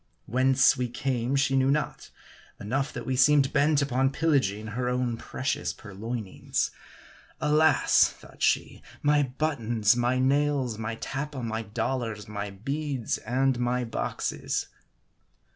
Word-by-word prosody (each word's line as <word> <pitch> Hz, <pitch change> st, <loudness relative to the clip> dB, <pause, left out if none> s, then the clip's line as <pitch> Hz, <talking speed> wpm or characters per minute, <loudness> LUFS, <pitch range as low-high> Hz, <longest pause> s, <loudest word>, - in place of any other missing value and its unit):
Whence 130 Hz, +3 st, +4 dB
we 125 Hz, -1 st, -1 dB
came 125 Hz, +1 st, -1 dB
she 135 Hz, -1 st, +2 dB
knew 135 Hz, 0 st, +3 dB
not; 150 Hz, +2 st, -1 dB, 0.5 s
enough, 135 Hz, +7 st, -1 dB
that -, -, -6 dB
we 130 Hz, -, -1 dB
seemed 135 Hz, +1 st, +4 dB
bent 145 Hz, 0 st, +3 dB
upon 135 Hz, -1 st, +1 dB
pillaging 135 Hz, -9 st, +1 dB
her 125 Hz, +3 st, -2 dB
own 125 Hz, -1 st, 0 dB
precious 130 Hz, +4 st, -3 dB
puiioinings. 110 Hz, 0 st, -3 dB, 0.7 s
Alas! 155 Hz, +1 st, +4 dB
thought -, -, -17 dB
she, -, -, +1 dB, 0.2 s
my 145 Hz, 0 st, +4 dB
buttons, 120 Hz, -6 st, +1 dB
my 120 Hz, +1 st, +1 dB
nails, 135 Hz, -3 st, +1 dB
my 115 Hz, 0 st, -3 dB
tappa, 140 Hz, +2 st, -5 dB
my 110 Hz, 0 st, -2 dB
dollars, 110 Hz, 0 st, -3 dB
my 105 Hz, -1 st, -4 dB
beads, 135 Hz, +5 st, -3 dB
and 130 Hz, +2 st, 0 dB
my 125 Hz, 0 st, 0 dB
boxes 115 Hz, -2 st, -3 dB
130 Hz, 125 wpm, -27 LUFS, 115-140 Hz, 0.7 s, Whence